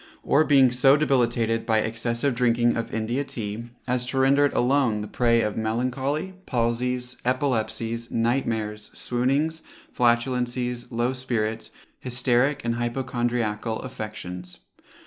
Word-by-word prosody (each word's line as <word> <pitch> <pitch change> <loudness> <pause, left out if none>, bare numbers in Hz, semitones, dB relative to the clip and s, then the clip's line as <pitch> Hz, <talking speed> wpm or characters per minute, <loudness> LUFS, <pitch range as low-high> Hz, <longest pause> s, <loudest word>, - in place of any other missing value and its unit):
or 150 - +4
being 135 -4 +5
so 135 +3 +5
debilitated 120 -5 +1
by 110 - +2
excessive 115 +4 0
drinking 120 0 +2
of 115 - -3
India 115 +5 -1
Tea, 110 -3 -5 0.2
as 125 0 0
to 135 - -3
render 135 +2 +4
it 145 - 0
alone 125 -4 +2
the 105 - -5
prey 115 0 +2
of 105 -2 -1
melancholy, 130 +10 -1
palsies, 125 +1 -1
epilepsies, 115 -3 -1
night 120 +4 +1
mares, 105 -2 -3
swoonings, 140 +6 0 0.3
flatulencies, 125 0 0
low 120 +2 0
spirits, 115 -4 -2 0.3
hysteric 125 +2 +1
and 115 0 0
hypochondriacal 120 -3 -1
affections. 105 -7 -7
120 Hz, 125 wpm, -25 LUFS, 115-130 Hz, 0.3 s, being